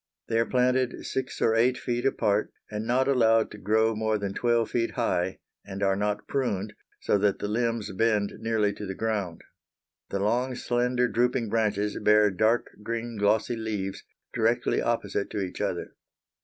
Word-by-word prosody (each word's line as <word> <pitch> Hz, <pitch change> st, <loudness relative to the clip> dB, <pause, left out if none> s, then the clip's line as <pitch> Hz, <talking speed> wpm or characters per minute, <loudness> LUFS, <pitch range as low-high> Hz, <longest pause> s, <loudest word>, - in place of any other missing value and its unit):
They 115 Hz, 0 st, +2 dB
are 115 Hz, -, +1 dB
planted 125 Hz, 0 st, +1 dB
six 130 Hz, 0 st, -3 dB
or 110 Hz, -, +4 dB
eight 120 Hz, +3 st, +3 dB
feet 120 Hz, +1 st, -1 dB
apart, 105 Hz, -5 st, +1 dB, 0.2 s
and 105 Hz, +1 st, -4 dB
not 130 Hz, +2 st, +2 dB
allowed 115 Hz, -4 st, +3 dB
to 105 Hz, -, -10 dB
grow 110 Hz, +2 st, +2 dB
more 110 Hz, 0 st, 0 dB
than 100 Hz, -1 st, -3 dB
twelve 120 Hz, -1 st, +1 dB
feet 115 Hz, -1 st, 0 dB
high; 95 Hz, -6 st, 0 dB, 0.3 s
and 100 Hz, 0 st, -5 dB
are 95 Hz, -1 st, +3 dB
not 105 Hz, +1 st, -2 dB
pruned, 105 Hz, -7 st, -1 dB, 0.3 s
so 100 Hz, -, +2 dB
that 100 Hz, 0 st, +2 dB
the -, -, -3 dB
limbs 115 Hz, -1 st, -1 dB
bend 105 Hz, 0 st, +1 dB
nearly 110 Hz, -2 st, +1 dB
to 105 Hz, 0 st, -7 dB
the 95 Hz, -, -4 dB
ground. 105 Hz, -6 st, -2 dB, 0.7 s
The -, -, -2 dB
long 125 Hz, +5 st, 0 dB
slender 125 Hz, +1 st, +1 dB
drooping 120 Hz, -1 st, 0 dB
branches 105 Hz, -2 st, 0 dB
bear 105 Hz, -1 st, +4 dB
dark 110 Hz, +5 st, +1 dB
green, 115 Hz, +2 st, -4 dB
glossy 110 Hz, +3 st, +2 dB
leaves, 105 Hz, -4 st, -4 dB, 0.3 s
directly 115 Hz, +2 st, +1 dB
opposite 100 Hz, -4 st, -1 dB
to 105 Hz, -, -3 dB
each 90 Hz, -, -6 dB
other. -, -, -3 dB
110 Hz, 170 wpm, -27 LUFS, 105-120 Hz, 0.7 s, or